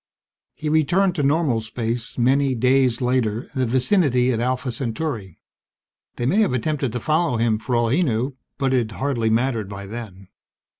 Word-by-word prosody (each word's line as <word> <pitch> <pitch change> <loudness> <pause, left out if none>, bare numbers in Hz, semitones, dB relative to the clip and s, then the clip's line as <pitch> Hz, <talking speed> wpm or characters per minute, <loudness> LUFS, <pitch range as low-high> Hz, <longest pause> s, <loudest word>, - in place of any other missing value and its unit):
He 155 - -5
returned 170 +5 +2
to 160 - -2
normal 140 -4 +2
space 115 +1 -4
many 130 +2 +2
"days" 125 0 +2
later 125 -2 0
in 135 - -4
the 130 - +1
vicinity 130 - +2
of 115 - -1
Alpha 125 +1 -1
Centauri. 115 - -4 0.8
They 120 - -3
may 145 +11 +2
have 210 -11 +2
attempted 135 0 -1
to 125 - -2
follow 155 -1 +1
him 115 -1 +1
for 125 +2 -2
all 120 -1 +2
he 145 +10 +2
knew, 130 -3 -1 0.2
but 135 -2 0
it 115 -4 0
hardly 125 -4 -1
mattered 115 -2 0
by 100 0 -7
then. 100 -3 -9
125 Hz, 170 wpm, -22 LUFS, 115-140 Hz, 0.8 s, returned